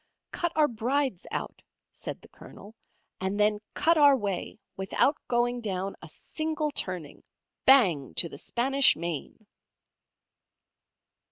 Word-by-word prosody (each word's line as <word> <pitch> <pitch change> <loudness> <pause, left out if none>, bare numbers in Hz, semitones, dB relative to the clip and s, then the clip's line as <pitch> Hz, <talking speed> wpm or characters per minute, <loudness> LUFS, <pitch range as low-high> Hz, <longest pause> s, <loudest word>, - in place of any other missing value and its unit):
"Cut 345 -1 -2
our 305 -1 +4
Brides 245 -2 -1
out," - - -5 0.3
said - - -8
the - - -14
Colonel, 205 +2 -14 0.5
"and 190 +2 -2
then 210 0 +3 0.2
cut 330 -1 +3
our 285 -2 +7
way, 200 -5 -4 0.2
without 195 +9 +1
going 240 0 0
down 195 -2 -3
a 160 - -11
single 310 - -3
turning, 180 - -4 0.4
Bang 185 - +5
to 170 - +2
the - - -10
Spanish 270 +3 +3
Main!" 170 +6 -6
225 Hz, 120 wpm, -28 LUFS, 190-275 Hz, 0.5 s, our